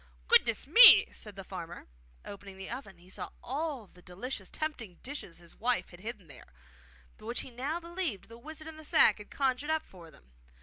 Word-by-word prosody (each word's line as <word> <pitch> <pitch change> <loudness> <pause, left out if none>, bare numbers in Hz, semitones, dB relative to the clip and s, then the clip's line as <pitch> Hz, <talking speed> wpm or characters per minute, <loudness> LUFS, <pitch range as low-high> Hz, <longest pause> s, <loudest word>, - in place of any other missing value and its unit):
'Goodness 230 -3 +4
me!' 460 - +10
said 210 -2 -5
the 195 - -8
farmer; 175 -2 -8 0.4
and - - -7
opening 195 -1 -12
the 190 0 -7
oven 200 -9 -7
he 175 +1 -19
saw 185 - -6
all 280 -3 -3
the 180 -2 -20
delicious, 190 +2 -6
tempting 260 - -4
dishes 265 - -7
his 170 -1 -14
wife 245 +2 -1
had 175 - -13
hidden 210 -3 -6
there, 125 - -14 0.7
but 215 - -11
which 235 - -2
he 260 - -10
now 275 +8 -3
believed 340 - -4
the 230 - -12
wizard 310 +4 -9
in 320 -1 -8
the 315 - -11
sack 315 -6 +5
had 210 - -11
conjured 270 +1 -1
up 315 0 0
for 170 -3 -14
them. 65 - -21
230 Hz, 205 wpm, -31 LUFS, 185-295 Hz, 0.7 s, me